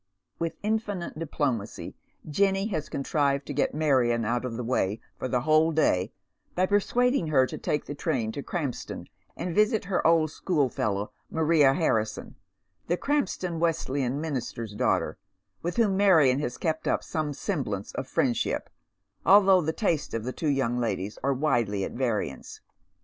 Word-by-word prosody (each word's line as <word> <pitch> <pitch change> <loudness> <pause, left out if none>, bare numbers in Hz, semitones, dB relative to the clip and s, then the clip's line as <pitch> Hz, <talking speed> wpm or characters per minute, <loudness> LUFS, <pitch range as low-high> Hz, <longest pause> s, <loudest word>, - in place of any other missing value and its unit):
With 165 -1 -2
infinite 205 -6 -2
diplomacy 135 -9 -3 0.3
Jenny 195 +5 +2
has 155 -7 -3
contrived 140 0 0
to 145 - -5
get 140 0 0
Marion 125 -7 +2
out 120 +3 0
of 115 -2 -4
the 125 - -3
way 110 -3 0 0.2
for - - -2
the 125 -1 0
whole 155 +3 +4
day 110 - +2 0.4
by 185 - +3
persuading 205 - +2
her 135 -4 +4
to - - -6
take 150 - -1
the - - -5
train 130 -7 -1
to 140 - -5
Krampston 140 -5 -4 0.3
and 175 - -3
visit 215 +3 +2
her 185 -4 +1
old 160 -2 +3
schoolfellow, 120 - -1 0.2
Maria 155 -4 +4
Hanison, 110 -10 -1 0.5
the 175 - +1
Krampston 190 - -1
Wesleyan 140 -5 0
minister's 120 -8 -4
daughter, 105 - 0 0.4
with 175 - -3
whom 205 -5 +3
Marion 160 -10 +5
has 125 -4 -3
kept 160 -1 -2
up - - +1
some 155 -2 -2
semblance 140 - -3
of - - -5
friendship, - - 0 0.5
although 195 0 +6
the 160 0 0
tastes 160 - -1
of 115 - -2
the 130 +2 -4
two 155 - -1
young 125 -4 +1
ladies 105 -3 -2
are 140 - +1
widely 120 -8 +1
at - - -3
variance. 110 - -3
150 Hz, 155 wpm, -27 LUFS, 125-170 Hz, 0.5 s, although